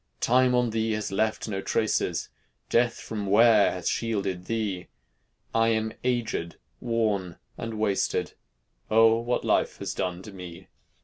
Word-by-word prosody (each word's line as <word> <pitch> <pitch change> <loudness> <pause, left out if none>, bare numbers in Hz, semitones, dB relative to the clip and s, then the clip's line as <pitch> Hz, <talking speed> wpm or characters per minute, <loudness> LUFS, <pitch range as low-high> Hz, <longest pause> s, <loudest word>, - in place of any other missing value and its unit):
"Time 125 +1 +3
on 125 -2 +2
thee 110 0 0
has 110 -1 -3
left 110 +4 0
no 95 -3 -3
traces, - - 0 0.4
Death 120 0 +2
from 105 -3 -5
wear 110 +1 +5
has 90 -2 -5
shielded 100 -6 -1
thee; 105 -5 -2 0.7
I 115 0 +3
am 110 -1 0
agéd, 115 -9 -1 0.2
worn, 105 -7 -1 0.2
and 115 -1 -5
wasted, 105 -2 0 0.6
O! 115 +1 +5
what 120 +1 -1
life - - +1
has 95 -1 -4
done 90 0 -3
to 105 - -9
me!" 90 -3 -10
110 Hz, 140 wpm, -27 LUFS, 95-115 Hz, 0.7 s, wear